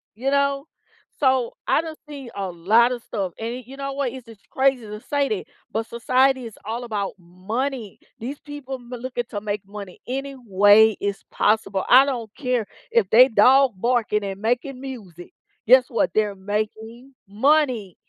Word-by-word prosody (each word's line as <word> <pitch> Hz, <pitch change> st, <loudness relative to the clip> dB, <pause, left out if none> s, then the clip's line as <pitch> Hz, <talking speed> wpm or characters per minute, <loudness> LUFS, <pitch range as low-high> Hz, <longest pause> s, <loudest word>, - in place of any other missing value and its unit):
you 265 Hz, +5 st, -1 dB
know? 280 Hz, 0 st, +1 dB, 0.5 s
So, 260 Hz, -4 st, +2 dB
I -, -, +3 dB
done 320 Hz, -1 st, -7 dB
seen 275 Hz, -5 st, -8 dB
a 195 Hz, -2 st, -3 dB
lotta 230 Hz, +8 st, +3 dB
stuff, 195 Hz, -6 st, -4 dB
and 240 Hz, +3 st, -4 dB
you 270 Hz, -, -11 dB
know 275 Hz, 0 st, -4 dB
what? 275 Hz, -3 st, -1 dB
It's 255 Hz, -1 st, -10 dB
just 225 Hz, -3 st, -16 dB
crazy 265 Hz, -2 st, +2 dB
to 210 Hz, 0 st, -7 dB
say 285 Hz, +2 st, -1 dB
that, 210 Hz, -3 st, -2 dB, 0.3 s
but 225 Hz, 0 st, -2 dB
society 255 Hz, +2 st, +1 dB
is 225 Hz, -, -13 dB
all 230 Hz, +3 st, -4 dB
about 205 Hz, -4 st, -3 dB
money. 210 Hz, +7 st, -4 dB, 0.2 s
These 265 Hz, +6 st, -6 dB
people 290 Hz, -3 st, -7 dB
m 245 Hz, -2 st, -13 dB
looking 245 Hz, 0 st, -4 dB
to 205 Hz, -, -4 dB
make 205 Hz, -1 st, -4 dB
money 200 Hz, -2 st, -10 dB
any 270 Hz, +2 st, -4 dB
way 210 Hz, -1 st, +5 dB
is 200 Hz, -1 st, -3 dB
possible 205 Hz, -2 st, +1 dB
I 260 Hz, +3 st, +8 dB
don't 235 Hz, -6 st, -4 dB
care 250 Hz, -5 st, -1 dB, 0.3 s
if 230 Hz, -5 st, +3 dB
they 255 Hz, +4 st, +8 dB
dog 255 Hz, +3 st, +5 dB
barking 225 Hz, -1 st, +1 dB
and 195 Hz, 0 st, -6 dB
making 250 Hz, +3 st, -1 dB
music, 200 Hz, -11 st, -9 dB, 0.4 s
guess 255 Hz, +1 st, +7 dB
what, 230 Hz, -, 0 dB
they're 210 Hz, -2 st, +1 dB
making 220 Hz, +6 st, -5 dB
money. 240 Hz, -, +1 dB
235 Hz, 170 wpm, -23 LUFS, 210-265 Hz, 0.5 s, I